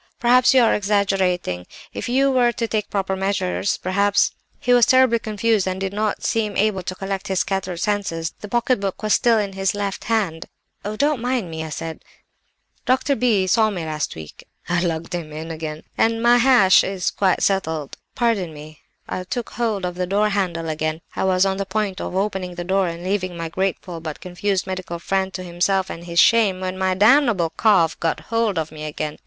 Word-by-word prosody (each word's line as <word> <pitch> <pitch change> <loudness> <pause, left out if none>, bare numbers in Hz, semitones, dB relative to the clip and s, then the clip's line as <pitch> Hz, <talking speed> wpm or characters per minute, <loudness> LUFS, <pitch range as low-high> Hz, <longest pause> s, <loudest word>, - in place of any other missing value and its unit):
"'Perhaps 245 +1 +5
you 260 -2 +5
are 230 - +4
exaggerating—if 195 - -1
you 270 +2 +3
were 245 -2 +3
to 235 -1 -3
take 215 -2 -2
proper 195 -1 -1
measures 145 - -1
perhaps—" 200 +2 +2 0.3
"He 245 - +2
was 245 -2 +5
terribly 260 -3 +4
confused 215 -2 0
and 185 0 -2
did 195 0 -3
not 210 0 -1
seem 215 -3 -1
able 205 -2 +1
to 185 +1 -5
collect 195 0 -4
his 190 -1 +1
scattered 190 -3 -3
senses; 180 -5 -2
the 210 - -6
pocket 240 +2 +1
book 195 +1 -4
was 215 - +2
still 235 -2 +4
in 200 -2 -1
his 195 0 -1
left 200 -1 -3
hand. 200 -8 -1 0.4
"'Oh, 210 +1 -4
don't 285 +1 +1
mind 245 -8 -1
me,' 160 0 -4
I 160 - -6
said. 160 +2 -6 0.8
'Dr. 260 +2 +2
B—— 225 -7 +2
saw 220 +3 +3
me 180 -6 -4
last 155 -1 -3
week' 80 -1 -11 0.2
(I 175 0 +1
lugged 165 -1 -2
him 165 -3 -4
in 160 +2 -6
again), 155 -1 -6 0.2
'and 225 0 +2
my 240 +1 +6
hash 245 -7 +6
is 190 -1 -2
quite 190 -3 +1
settled; 160 -7 -1 0.2
pardon 205 -10 0
me—' 150 0 -11 0.3
I 185 - -4
took 230 +6 -5
hold 220 -6 -1
of 180 - -3
the 180 0 -3
door 205 +3 +2
handle 180 -5 -1
again. 155 +1 -2
I - - -1
was 185 0 +3
on 190 0 0
the 195 - -2
point 200 -1 -2
of - - -5
opening 190 -2 -2
the 175 - -4
door 190 +1 +1
and 170 0 -6
leaving 185 -2 -2
my 165 -1 -4
grateful 180 -1 -3
but 155 -2 -6
confused 185 +1 -2
medical 185 -2 -5
friend 190 +2 -1
to 185 - -5
himself 185 +2 0
and 170 +1 -8
his 170 -1 -6
shame, 210 -1 +5
when 185 0 -3
my 185 0 0
damnable 215 - +4
cough 175 -3 +3
got 165 - -1
hold 230 -4 +1
of 160 -1 -2
me 155 -1 -7
again. 150 0 -5
190 Hz, 200 wpm, -21 LUFS, 175-215 Hz, 0.8 s, my